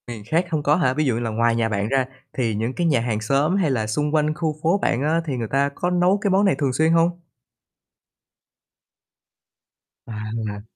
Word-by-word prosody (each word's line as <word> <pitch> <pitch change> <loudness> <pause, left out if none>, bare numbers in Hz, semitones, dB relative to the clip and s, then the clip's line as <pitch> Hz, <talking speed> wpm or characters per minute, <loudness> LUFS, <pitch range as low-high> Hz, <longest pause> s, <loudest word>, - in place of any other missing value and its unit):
Miền 115 -3 -7
khác 165 +7 +1
hông 155 -2 -1
có 150 +1 +3
hả? 155 -7 +1
Ví 155 +3 0
dụ 130 - +1
như 115 - -2
là 120 -1 -2
ngoài 115 +1 +1
nhà 115 -1 0
bạn 100 -1 -1
ra 135 0 +1 0.3
thì 115 -4 -1
những 115 +4 -2
cái 175 +3 0
nhà 140 -7 +3
hàng 115 -2 -2
xóm, 140 - +1
hay 180 -7 +1
là 110 -4 -1
xung 150 +7 -1
quanh 155 0 +2
khu 155 -1 -2
phố 170 +5 +3
bạn 130 -10 0
á 160 +3 +1
thì 140 -4 -3
người 115 -2 -3
ta 140 +4 +1
có 175 - -1
nấu 180 +2 +2
cái 200 - +1
món 195 +2 +3
này 190 - +3
thường 135 -4 0
xuyên 160 +5 +2
hông? 170 +1 +2 2.8
À. 110 -1 -5
140 Hz, 220 wpm, -22 LUFS, 115-165 Hz, 2.8 s, có